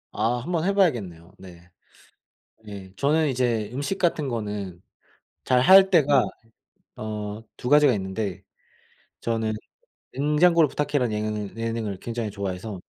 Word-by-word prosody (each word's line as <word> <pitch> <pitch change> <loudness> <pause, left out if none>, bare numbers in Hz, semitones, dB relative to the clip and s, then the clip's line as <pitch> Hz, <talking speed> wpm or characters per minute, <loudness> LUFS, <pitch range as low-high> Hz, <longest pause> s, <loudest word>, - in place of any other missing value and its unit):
아. 115 +3 +1
한번 170 +1 -1
해봐야겠네요. 110 - 0
네. 90 -2 -14 1.0
예. 100 -2 -9
저는 155 +3 +2
이제 120 -5 0
음식 145 +9 -2
같은 165 -5 +1
거는 105 -7 -4 0.6
잘할 190 +10 +6
때가 145 -7 +4 0.7
어 105 0 -5 0.2
2 125 - -4
가지가 145 -2 +6
있는데 95 -1 -4 0.8
저는 115 -1 -1 0.6
'냉장고를 150 +4 +3
부탁해'라는 145 -4 -1
예능 105 -1 -3
예능을 115 -3 -3
굉장히 115 0 -4
좋아해서 100 0 -5
115 Hz, 255 characters per minute, -24 LUFS, 105-145 Hz, 1.0 s, 잘할